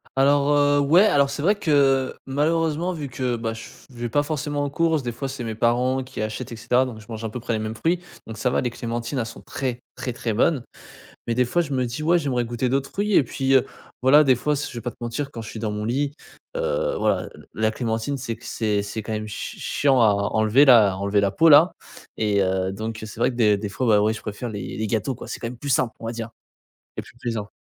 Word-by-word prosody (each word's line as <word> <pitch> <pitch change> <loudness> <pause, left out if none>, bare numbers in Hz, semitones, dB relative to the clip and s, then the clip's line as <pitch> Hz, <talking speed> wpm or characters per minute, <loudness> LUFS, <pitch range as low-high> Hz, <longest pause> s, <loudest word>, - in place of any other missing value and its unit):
Alors, 140 +1 +3
heu, 145 0 +4
ouais, 160 +8 +5
alors, 140 -7 +3
c'est 140 +1 -4
vrai, 200 +6 +3
que, 140 -7 +2
malheureusement 160 +5 0
vu 150 -4 -5
que, 125 -1 -2
bah, 115 -1 -3
je 115 - -8
f - - -17
je 120 - -15
vais 120 -1 -2
pas 145 +5 +2
forcément 145 -1 -2
en 140 - -1
courses, 160 -1 +1
des 120 - -2
fois, 135 +4 -5
c'est 135 -2 -6
mes 110 -1 -4
parents 125 +3 +1
qui 130 -3 -7
achètent, 110 +2 -4
et - - -5
cetera. 120 +3 +2
Donc, 115 -4 -7
je 110 - -14
mange 110 0 -6
à 110 - -2
peu 125 - -6
près 115 0 -3
les 110 - 0
mêmes 110 +1 -4
fruits. 170 +8 0 0.3
Donc, 110 -1 -8
ça 125 +3 +1
va, - - +1
les 125 - -1
clémentines, 120 +2 -4
elles 115 - -1
sont 115 - -10
très, 125 -3 -4
très, 125 - -4
très 115 -2 -3
bonnes. 125 +3 +2 0.6
Mais, 115 - +1
des 125 0 +3
fois, 175 +8 +1
je 145 -4 -4
me 130 -1 +1
dis: 125 +6 -5
«Ouais 170 +2 +4
j'aimerais 125 -5 -1
goûter 120 +2 -2
d'autres 135 +1 0
fruits» 205 +1 -1
et - - +6
puis, 135 +2 -1
heu, 130 - +5 0.4
voilà, 145 +4 +6
des 130 -3 +4
fois, 150 +5 0
si 145 - -3
je 120 - -8
vais - - -4
pas 120 - -4
te - - -25
mentir, 120 +4 -3
quand 115 - -7
je 110 - -8
suis 110 - -7
dans 110 -1 -2
mon 105 0 -3
lit, 140 +4 -1 0.4
heu, - - -1
voilà, - - 0
le - - -15
la 110 0 +1
clémentine 115 +4 -2
c'est 115 -3 -4
que 120 - -16
c'est 105 -2 0
c'est 110 +2 -5
quand 110 - -7
même 110 0 -3
ch 105 - -6
ch - - -12 0.2
chiant 135 -3 +4
à 110 - +6
à - - +4 0.2
enlever 110 +6 +5
la 115 -7 +7
à - - -6
enlever 100 +1 +1
la 100 -1 +1
peau 165 +8 +4
là 155 +5 +7 0.4
et 105 -2 +2
heu, 95 0 0
donc, 110 +2 -5
heu, - - -6
c'est 105 - -10
vrai 130 - +2
que - - -9
des 105 -4 +4
des 100 0 -4
fois, 125 +5 -2
ben, 105 -2 +5
ouais, 110 +1 +2
je 110 - -8
préfère 110 +3 -5
les 100 -3 -6
les 110 0 -2
gâteaux, 115 +4 -1
quoi. - - -10
C'est 130 - -6
quand 115 - -4
même 120 0 -7
plus 140 +3 -6
simple, 130 -2 +2
on - - -8
va 115 - -2
dire, 115 -1 -5 0.7
et - - -3
plus - - -17
plaisant. 115 -4 -4
125 Hz, 280 wpm, -23 LUFS, 110-140 Hz, 0.7 s, la